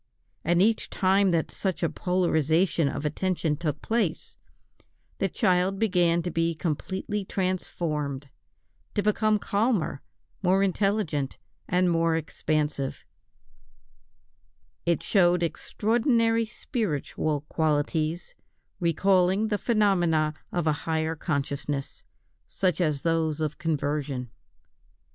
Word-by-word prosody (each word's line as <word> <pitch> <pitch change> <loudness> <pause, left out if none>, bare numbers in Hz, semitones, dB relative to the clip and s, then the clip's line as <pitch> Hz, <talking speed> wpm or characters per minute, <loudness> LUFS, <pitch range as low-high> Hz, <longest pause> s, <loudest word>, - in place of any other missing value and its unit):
And 175 +3 +3
each 225 +1 +1
time 195 +1 +3
that 165 -2 0
such 190 -3 -2
a - - +4
polarisation 165 -2 +1
of 145 +2 -4
attention 165 0 0
took 150 -3 -3
place, 220 -8 -1 0.8
the 195 - +1
child 185 +2 +2
began 175 -5 +2
to 175 - -3
be 165 +1 0
completely 190 +6 -3
transformed, 155 -7 -2 0.7
to 205 - +1
become 215 +1 +2
calmer, 205 - 0 0.4
more 190 +1 +3
intelligent, 195 -8 0 0.3
and 180 0 +2
more 165 -1 +2
expansive; 150 -3 -2 1.8
it 170 -3 +1
showed 175 -3 +3
extraordinary 230 - +1
spiritual 155 - -2
qualities, 155 - -1 0.5
recalling 185 +4 +2
the 205 -2 0
phenomena 175 -9 +2 0.2
of 175 -2 -1
a 155 - +3 0.2
higher 160 0 0
consciousness, 140 -2 -3 0.4
such 185 -3 0
as 150 -5 0
those 160 -2 +1
of 155 -1 -2
conversion. 145 -6 -2
170 Hz, 105 wpm, -27 LUFS, 155-195 Hz, 1.8 s, a